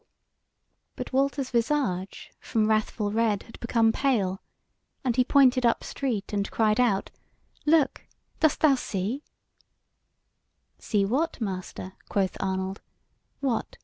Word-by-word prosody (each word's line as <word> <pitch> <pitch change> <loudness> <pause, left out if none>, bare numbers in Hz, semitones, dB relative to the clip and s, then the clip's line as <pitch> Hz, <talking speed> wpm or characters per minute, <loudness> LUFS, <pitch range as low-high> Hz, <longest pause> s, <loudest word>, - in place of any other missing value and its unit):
But - - -6
Walter's 275 0 +1
visage 230 -7 -1
from 215 -2 0
wrathful 215 -1 0
red 220 -2 +1
had 225 - -14
become 230 -1 +2
pale, 210 -8 0 0.6
and 250 -3 0
he 250 - +4
pointed 260 -1 +4
up 235 -1 +2
street, 235 -8 -3
and 200 0 -1
cried 215 0 +2
out: 225 -6 +2 0.6
"Look! 305 -3 +3 0.3
dost 315 -3 +2
thou 305 -3 +6
see?" 220 +1 -2 1.6
"See 205 -2 +1
what, 280 +11 0
master?" 190 -3 -5 0.2
quoth 195 -2 0
Arnold: 190 0 -2 0.6
"what! 260 -5 -2
225 Hz, 115 wpm, -27 LUFS, 200-265 Hz, 1.6 s, thou